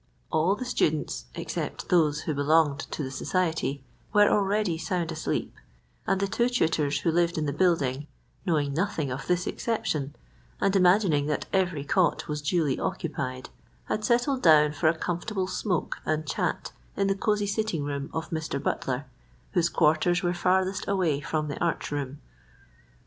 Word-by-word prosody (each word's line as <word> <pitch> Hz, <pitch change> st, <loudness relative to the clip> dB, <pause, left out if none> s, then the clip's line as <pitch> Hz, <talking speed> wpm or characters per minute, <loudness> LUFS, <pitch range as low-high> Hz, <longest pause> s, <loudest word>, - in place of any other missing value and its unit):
All 170 Hz, +6 st, +3 dB
the 255 Hz, -, -5 dB
students, 155 Hz, -, 0 dB
except -, -, -4 dB
those 155 Hz, -4 st, +3 dB
who 155 Hz, -, -2 dB
belonged 145 Hz, 0 st, +3 dB
to 150 Hz, -, -4 dB
the 130 Hz, -, -4 dB
society, 160 Hz, -2 st, -1 dB, 0.3 s
were 205 Hz, -1 st, +6 dB
already 205 Hz, -3 st, +2 dB
sound 170 Hz, +1 st, -2 dB
asleep, 155 Hz, -1 st, -2 dB, 0.5 s
and 195 Hz, -1 st, +2 dB
the 200 Hz, -, +1 dB
two 235 Hz, +5 st, +1 dB
tutors 155 Hz, -10 st, +1 dB
who 165 Hz, -, +2 dB
lived 170 Hz, 0 st, +1 dB
in 155 Hz, -, 0 dB
the 140 Hz, -, -1 dB
building, 150 Hz, -5 st, +1 dB, 0.4 s
knowing 150 Hz, -6 st, 0 dB
nothing 165 Hz, -4 st, -1 dB
of 130 Hz, +1 st, -5 dB
this 180 Hz, 0 st, +1 dB
exception, 150 Hz, -, -2 dB, 0.4 s
and 195 Hz, 0 st, +2 dB
imagining 180 Hz, -6 st, +4 dB
that 150 Hz, -, -1 dB
every 180 Hz, -7 st, +1 dB
cot 170 Hz, +3 st, +1 dB
was 150 Hz, -1 st, -3 dB
duly 150 Hz, -2 st, +1 dB
occupied, 140 Hz, -8 st, -3 dB, 0.4 s
had 215 Hz, -, -2 dB
settled 245 Hz, +4 st, +2 dB
down 150 Hz, -2 st, +6 dB
for 155 Hz, +2 st, +1 dB
a 165 Hz, -, 0 dB
comfortable 185 Hz, +4 st, -2 dB
smoke 185 Hz, -2 st, -2 dB
and 155 Hz, 0 st, -1 dB
chat 140 Hz, -, -2 dB, 0.3 s
in 195 Hz, -, +2 dB
the 195 Hz, -, +2 dB
cozy 210 Hz, 0 st, 0 dB
sitting 205 Hz, -6 st, -1 dB
room 140 Hz, -1 st, -3 dB
of 160 Hz, -, -4 dB
Mr. 160 Hz, -3 st, -2 dB
Butler, 135 Hz, 0 st, -2 dB, 0.5 s
whose 175 Hz, -3 st, +2 dB
quarters 170 Hz, +3 st, +2 dB
were 175 Hz, 0 st, +1 dB
farthest 185 Hz, +2 st, +1 dB
away 175 Hz, -8 st, +1 dB
from 155 Hz, 0 st, -2 dB
the 145 Hz, -, -3 dB
arch 170 Hz, -3 st, -1 dB
room. 145 Hz, -1 st, -3 dB
165 Hz, 160 wpm, -27 LUFS, 145-190 Hz, 0.5 s, were